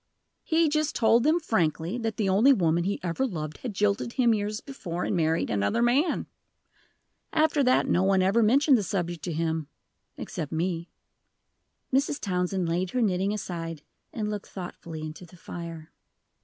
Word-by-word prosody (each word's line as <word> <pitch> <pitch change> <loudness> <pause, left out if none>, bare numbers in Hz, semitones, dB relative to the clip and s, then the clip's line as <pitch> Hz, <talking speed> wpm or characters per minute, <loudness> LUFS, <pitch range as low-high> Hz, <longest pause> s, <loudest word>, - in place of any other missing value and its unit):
"He 325 0 +2
just 305 0 0
told 230 0 +4
them 310 +6 +3
frankly 180 - 0
that 225 -2 -3
the 210 - 0
only 215 +9 +5
woman 170 -5 +1
he 200 +1 -1
ever 175 +8 -1
loved 155 - -5
had 235 -6 -5
jilted 210 +4 0
him 240 -4 +3
years 210 0 -2
before, 180 - -5
and - - -1
married 160 -1 +1
another 100 - +1
man. 275 +8 +2 1.1
After 310 -2 +3
that 255 0 +3
no 180 - +2
one 190 -1 +3
ever 200 +5 +3
mentioned 265 +4 +5
the - - -2
subject 175 -5 -3
to 175 - -2
him, 160 -1 -1 0.5
except 150 - -5
me." 170 +1 -2 1.0
Mrs. 280 +2 +1
Townsend 180 -1 -1
laid 175 +2 0
her 250 - -1
knitting 190 -1 +1
aside, 165 -6 -5 0.3
and 215 -2 -3
looked 210 -1 -4
thoughtfully 170 -3 -7
into 155 +3 -7
the 175 +1 -15
fire. 165 -2 -8
190 Hz, 165 wpm, -27 LUFS, 170-235 Hz, 1.1 s, only